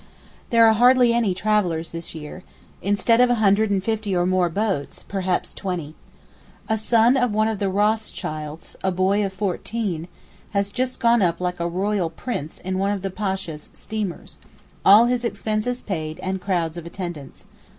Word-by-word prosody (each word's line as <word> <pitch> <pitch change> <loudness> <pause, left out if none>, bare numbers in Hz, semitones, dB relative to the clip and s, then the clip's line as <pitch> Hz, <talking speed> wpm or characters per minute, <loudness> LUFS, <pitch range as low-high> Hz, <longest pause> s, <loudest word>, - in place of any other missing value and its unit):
There 230 -2 +6
are 220 - +6
hardly 245 +1 +5
any 225 -6 +1
travellers 185 -5 0
this 165 0 -6
year, 160 +4 -8 0.4
instead 205 +4 +3
of 250 - +5
a 245 - +3
hundred 215 0 +3
and 195 -2 0
fifty 215 -3 -1
or 175 0 +2
more 185 -1 +2
boats, 195 -5 -2
perhaps 190 -2 -1
twenty. 175 -6 -4 0.7
A 220 - +1
son 230 +3 +3
of 245 -3 +2
one 215 +1 +2
of 220 -3 -2
the 200 - 0
Rothschilds, 190 -7 -2
a 190 - +2
boy 190 +3 +2
of 195 - -2
fourteen, 190 -2 -3 0.5
has 200 0 0
just 255 +2 -2
gone 235 -2 +4
up 175 -3 +1
like 180 -1 -2
a 170 - 0
royal 190 0 0
prince 160 - -5
in 185 0 -3
one 195 +1 +1
of 200 -2 -3
the 195 - -2
Pasha's 190 -6 -4
steamers—all 210 +1 +1
his 245 0 0
expenses 235 +1 -2
paid 160 -5 -4
and 190 0 -3
crowds 175 -4 -1
of 170 -1 -7
attendants. 170 -6 -7
195 Hz, 170 wpm, -23 LUFS, 180-220 Hz, 0.7 s, There